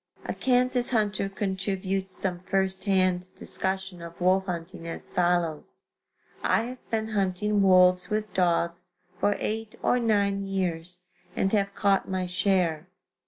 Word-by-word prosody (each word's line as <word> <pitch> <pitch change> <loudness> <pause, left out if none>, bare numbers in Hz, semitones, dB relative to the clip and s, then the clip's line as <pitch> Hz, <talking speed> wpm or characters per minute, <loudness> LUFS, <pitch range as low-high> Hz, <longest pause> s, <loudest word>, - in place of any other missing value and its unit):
] - - -24
A - - -2
Kansas 250 -1 +1
hunter 205 -4 0
contributes 195 -1 -2
some 180 -2 -2
first 190 +1 -1
hand 185 -2 +2
discussion 190 -2 0
of 170 0 -10
wolf 190 +2 +2
hunting 170 -1 -5
as 165 - -7
follows: 175 -3 0 0.6
I 220 - +2
have 250 +2 -9
been 220 -1 -1
hunting 205 0 +1
wolves 180 -1 +5
with 215 -1 -2
dogs 175 0 0 0.3
for 205 - +2
eight 220 0 -4
or 250 - +3
nine 200 -4 +1
years 180 -2 -2 0.3
and 195 - +1
have 200 -2 0
caught 200 -2 +2
my 185 -1 -1
share. 180 -3 0
190 Hz, 140 wpm, -27 LUFS, 180-205 Hz, 0.6 s, wolves